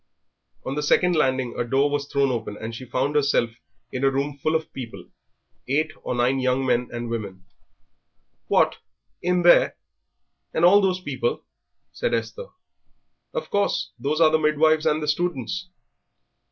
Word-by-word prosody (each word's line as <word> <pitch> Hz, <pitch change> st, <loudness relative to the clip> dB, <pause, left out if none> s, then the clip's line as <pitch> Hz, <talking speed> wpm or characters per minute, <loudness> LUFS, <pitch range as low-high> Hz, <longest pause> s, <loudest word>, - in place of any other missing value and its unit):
On 135 Hz, -, -3 dB
the 150 Hz, -, -2 dB
second 180 Hz, +4 st, +3 dB
landing 130 Hz, -5 st, +1 dB
a -, -, +2 dB
door 135 Hz, +4 st, +2 dB
was 145 Hz, 0 st, -2 dB
thrown 140 Hz, -2 st, +1 dB
open, 110 Hz, -3 st, -4 dB
and 110 Hz, +1 st, -6 dB
she 130 Hz, +3 st, -8 dB
found 135 Hz, +3 st, 0 dB
herself 140 Hz, -5 st, +2 dB, 0.4 s
in 130 Hz, -, -4 dB
a 135 Hz, -, +5 dB
room 140 Hz, +2 st, -2 dB
full 155 Hz, +3 st, -1 dB
of 160 Hz, 0 st, -2 dB
people, 125 Hz, -4 st, -9 dB, 0.6 s
eight 155 Hz, +4 st, +1 dB
or -, -, -3 dB
nine 125 Hz, +2 st, +2 dB
young 130 Hz, +1 st, +1 dB
men 125 Hz, -1 st, +1 dB
and 120 Hz, 0 st, -4 dB
women. 100 Hz, -5 st, -5 dB, 1.0 s
"What! -, -, +3 dB, 0.4 s
in 180 Hz, 0 st, +1 dB
there? 175 Hz, -, +5 dB, 0.8 s
and 165 Hz, -, +4 dB
all 200 Hz, +3 st, +7 dB
those 185 Hz, -2 st, +1 dB
people?" 480 Hz, -, -2 dB, 0.5 s
said -, -, -1 dB
Esther. 485 Hz, 0 st, -4 dB, 0.8 s
"Of -, -, -5 dB
course; 200 Hz, 0 st, 0 dB
those 150 Hz, +3 st, -1 dB
are 160 Hz, -2 st, +6 dB
the 160 Hz, -, +3 dB
midwives 155 Hz, +1 st, +3 dB
and 155 Hz, +1 st, +1 dB
the -, -, -3 dB
students." 175 Hz, +2 st, -2 dB
145 Hz, 160 wpm, -24 LUFS, 125-160 Hz, 1.0 s, all